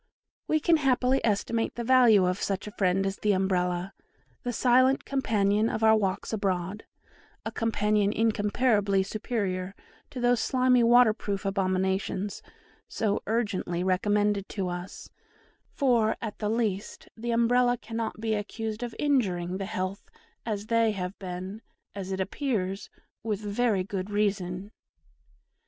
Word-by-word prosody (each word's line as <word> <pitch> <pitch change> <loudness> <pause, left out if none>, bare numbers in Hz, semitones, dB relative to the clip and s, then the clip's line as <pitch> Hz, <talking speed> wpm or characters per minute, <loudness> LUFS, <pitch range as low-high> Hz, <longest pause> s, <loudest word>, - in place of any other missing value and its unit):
We 310 - +2
can 330 +1 +3
happily 260 -2 +2
estimate 225 +1 0
the 240 - -3
value 235 -6 +5
of 180 +2 -1
such 195 -1 -2
a 210 - -7
friend 195 -1 +1
as 195 0 -2
the 210 -1 +1
Umbrella, 180 -1 0 0.5
the 245 - -3
silent 255 +3 +3
companion 215 -5 +1
of 220 - -3
our 220 0 +6
walks 195 0 -1
abroad, 195 -1 -2 0.6
a - - -3
companion 210 -2 +1
incomparably 210 -2 +2
superior 195 -3 -3 0.3
to 255 - -7
those 245 -1 +3
slimy 255 0 +3
waterproof 225 -4 +3
abominations 190 0 -1 0.5
so 210 -2 -1
urgently 200 -6 -1
recommended 205 +2 +1
to 190 -3 -3
us, 175 +1 -7 0.6
for, 235 -5 +2
at 220 -3 -6
the 210 - -1
least, 215 -3 -2
the 235 +1 -5
Umbrella 245 +1 +3
cannot 225 -2 -5
be 220 0 -1
accused 215 +1 -4
of 240 -2 -5
injuring, 185 -11 0
the 195 - -4
health 185 +2 -4 0.4
as 210 -2 -2
they 230 -1 +2
have 185 -1 -4
been, 185 +3 -6 0.3
as 195 -1 -6
it 190 - -2
appears, 195 -2 -2 0.3
with 215 -3 -2
very 210 -1 0
good 190 0 -4
reason. 200 -2 -1
210 Hz, 135 wpm, -27 LUFS, 190-230 Hz, 0.6 s, our